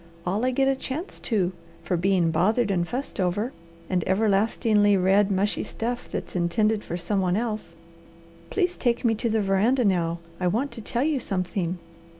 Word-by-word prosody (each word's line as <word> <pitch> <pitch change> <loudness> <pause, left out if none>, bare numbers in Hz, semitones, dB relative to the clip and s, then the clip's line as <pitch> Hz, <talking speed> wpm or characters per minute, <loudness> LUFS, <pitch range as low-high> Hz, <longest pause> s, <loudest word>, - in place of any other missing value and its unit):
"All 195 +6 0
I 255 - +3
get 270 +1 +2
a 270 - +3
chance 285 +7 -5
to, 195 -6 0 0.3
for 180 - 0
being 175 -1 +2
bothered 205 +7 +2
and 175 -2 0
fussed 255 +2 -5
over, 200 +7 0 0.3
and 180 -2 0
everlastingly 205 +1 +3
read 195 +2 +3
mushy 200 +1 +1
stuff 240 +2 -4
that's - - -5
intended 210 +5 +1
for 175 - -4
some 190 +3 -1
one 180 0 +1
else. 215 -7 -3 0.7
Please 360 -3 0
take 240 -1 0
me 225 - +4
to 230 +2 -1
the 220 -1 +1
veranda 215 +6 +2
now; 170 -4 +1 0.2
I 180 - +1
want 235 +10 0
to 235 -1 -8
tell 235 +4 -1
you 300 -2 +1
something." 185 -4 -2
205 Hz, 175 wpm, -25 LUFS, 185-235 Hz, 0.7 s, me